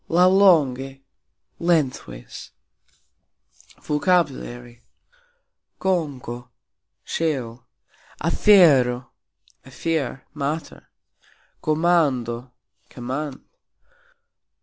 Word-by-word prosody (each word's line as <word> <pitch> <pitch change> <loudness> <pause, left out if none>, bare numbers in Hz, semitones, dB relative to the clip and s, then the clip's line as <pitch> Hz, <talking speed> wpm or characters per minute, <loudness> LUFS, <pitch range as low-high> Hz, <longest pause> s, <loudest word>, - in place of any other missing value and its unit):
"Lauxlonge", 160 -8 +3 0.6
lengthways. 135 - -2 1.3
VOCABULARY. 140 -7 -1 1.0
konko: 135 -10 -2 0.5
shell 125 -7 -3 0.5
afero: 145 - +4 0.5
affair, 145 -6 -3
matter. 150 +2 -4 0.7
komando: 140 -7 +1 0.4
command. 130 +3 -5
140 Hz, 40 wpm, -23 LUFS, 125-165 Hz, 1.3 s, afero